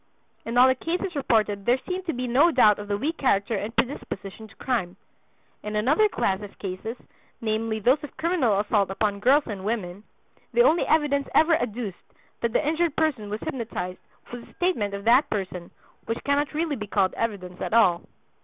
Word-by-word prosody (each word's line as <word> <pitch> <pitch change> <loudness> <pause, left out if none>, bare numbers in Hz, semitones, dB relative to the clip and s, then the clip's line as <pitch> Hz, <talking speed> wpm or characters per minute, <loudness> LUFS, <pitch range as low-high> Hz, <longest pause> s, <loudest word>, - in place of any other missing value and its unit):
In 230 +1 -2
all 250 +1 +8
the 260 - +4
cases 345 +6 -3
reported 215 -7 +1
there 245 +2 +4
seemed 370 0 -4
to 330 - 0
be 250 +1 -3
no 265 +8 +4
doubt 215 -10 +4
of 205 - -7
the 205 0 -1
weak 315 +9 -2
character 205 -4 +1
and 210 +3 -4
predisposition 220 -5 -3
to 215 - -20
crime. 205 -9 -2 0.7
In 210 0 -5
another 295 - +3
class 190 - -1
of 205 -1 -10
cases, 200 +5 -5 0.4
namely 220 0 -1
those 255 +8 +2
of 295 - -9
criminal 300 - +1
assault 205 -1 +1
upon 200 +1 -1
girls 275 +7 +4
and 200 -4 -6
women, 200 -3 -3 0.5
the 480 - +5
only 345 -8 +3
evidence 290 -3 +1
ever 320 +1 +5
adduced 220 - -4 0.4
that 235 - -1
the 290 - 0
injured 325 0 +1
person 275 -10 0
was 210 +1 -4
hypnotized 215 -7 -4 0.3
was 245 -1 -7
the - - -18
statement 225 - 0
of 200 - -7
that 245 +6 +4
person, 185 -4 -4 0.4
which 230 +1 -3
cannot 285 +1 0
really 315 -1 0
be 210 -4 -6
called 195 -2 +1
evidence 195 -5 -4
at - - -3
all. 180 -7 +4
230 Hz, 190 wpm, -25 LUFS, 205-285 Hz, 0.7 s, all